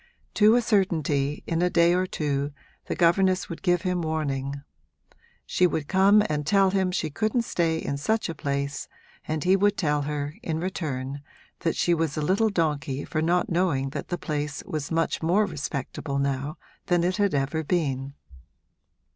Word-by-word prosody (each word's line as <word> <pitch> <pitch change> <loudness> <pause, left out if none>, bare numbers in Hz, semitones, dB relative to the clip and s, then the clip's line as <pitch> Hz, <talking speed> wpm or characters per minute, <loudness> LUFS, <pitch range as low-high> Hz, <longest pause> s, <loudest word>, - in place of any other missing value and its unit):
To 215 +2 +5
a 245 - +3
certainty, 155 - +1
in 165 0 -1
a 180 - +3
day 170 0 +4
or 185 +1 +1
two, 145 -3 -2 0.3
the - - -2
governess 185 +2 +3
would 170 - -6
give 175 0 +2
him 180 -2 0
warning: 140 -3 -2 0.8
she 180 - +3
would 155 -4 -3
come 195 +4 +5
and 150 -1 -1
tell 195 +4 +3
him 190 -1 +1
she 160 -4 -2
couldn't 220 - 0
stay 165 -6 0
in 140 -3 -3
such 220 +10 0
a 165 - -4
place, 140 -1 -3 0.4
and 155 -1 -2
he 185 +1 +4
would 205 +1 +2
tell 150 -4 +1
her, 145 0 -3
in 160 -1 -2
return, 140 -6 -3 0.4
that 165 -2 0
she 175 - +2
was 160 -3 -1
a - - 0
little 200 +7 +2
donkey 145 -7 -1
for 155 - -2
not 175 +3 +1
knowing 165 -7 +1
that - - -5
the 175 - -2
place 150 -3 -3
was 150 -2 -4
much 165 0 0
more 180 +6 +3
respectable 140 -3 -4
now 140 +2 -1 0.3
than 175 -1 +2
it 180 +2 0
had 200 -6 +2
ever 145 +3 0
been. 140 -5 -1
160 Hz, 175 wpm, -26 LUFS, 145-185 Hz, 0.8 s, To